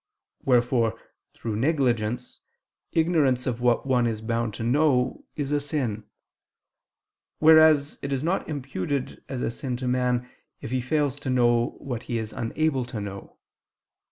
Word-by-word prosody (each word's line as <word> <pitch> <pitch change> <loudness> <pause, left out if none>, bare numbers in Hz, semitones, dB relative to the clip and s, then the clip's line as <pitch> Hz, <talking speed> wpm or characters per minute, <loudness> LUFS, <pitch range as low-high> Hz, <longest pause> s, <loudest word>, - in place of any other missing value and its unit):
Wherefore 120 -3 +2 0.4
through 110 -3 -4
negligence, 125 -4 0 0.5
ignorance 155 -7 +2
of 120 -2 -2
what 120 0 +2
one 125 -3 +2
is 110 -1 -3
bound 115 -2 -1
to 115 - -5
know, 130 0 +2
is 145 -2 -3
a 145 - +2
sin; 130 -8 -2 1.3
whereas 155 -2 +6
it 140 - -4
is 135 0 -1
not 175 +2 -1
imputed 135 -2 -3
as 130 -2 -3
a - - 0
sin 125 +1 -4
to 130 0 -4
man, 125 -1 +1 0.3
if - - -7
he 130 0 0
fails 145 +1 0
to 140 - -5
know 120 -2 +2
what 125 -5 -5
he 120 - 0
is 110 -1 -4
unable 135 +3 0
to 120 -2 -6
know. 100 -1 -8
125 Hz, 150 wpm, -26 LUFS, 120-145 Hz, 1.3 s, whereas